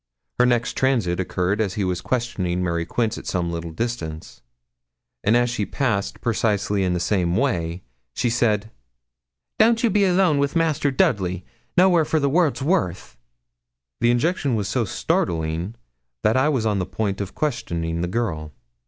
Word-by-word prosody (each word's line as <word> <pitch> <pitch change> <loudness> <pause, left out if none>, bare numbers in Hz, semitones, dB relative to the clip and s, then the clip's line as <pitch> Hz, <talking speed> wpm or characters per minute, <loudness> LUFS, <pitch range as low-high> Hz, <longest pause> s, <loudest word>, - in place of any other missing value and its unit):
Her 125 - +5
next 120 -1 +1
transit 115 -10 +1
occurred 95 +3 0
as 100 -3 -1
he 105 - -1
was 90 -1 -1
questioning 95 -8 -1
Mary 85 -1 -1
Quince 115 +3 -1
at - - -12
some 85 -2 -1
little 85 0 -4
distance; 80 -5 -5 0.8
and 110 +4 +4
as 120 0 +3
she 120 -3 -2
passed 105 -4 -1
precisely 105 -3 0
in 90 -1 +1
the - - -1
same 85 -1 +1
way, 90 -8 -1 0.3
she - - 0
said 110 -3 +1 0.9
'Don't 230 +1 +4
you 230 - +3
be 200 0 +3
alone 180 -5 +3
wi' 140 - +3
Master 155 -3 +2
Dudley 95 -8 +1 0.3
nowhere 180 -2 +5
for 155 +1 +1
the 140 -1 +1
world's 155 -4 +2
worth.' 115 - -1 0.8
The 120 - +3
injunction 135 +1 +1
was 105 -3 -1
so 120 0 0
startling 85 +1 -1 0.5
that 110 - +3
I 130 +3 +3
was 130 -7 0
on 105 -2 +1
the 90 - -2
point 100 +1 -2
of 100 -1 -6
questioning 85 - -2
the 90 - -1
girl. 85 -8 -2
110 Hz, 165 wpm, -23 LUFS, 90-130 Hz, 0.9 s, Her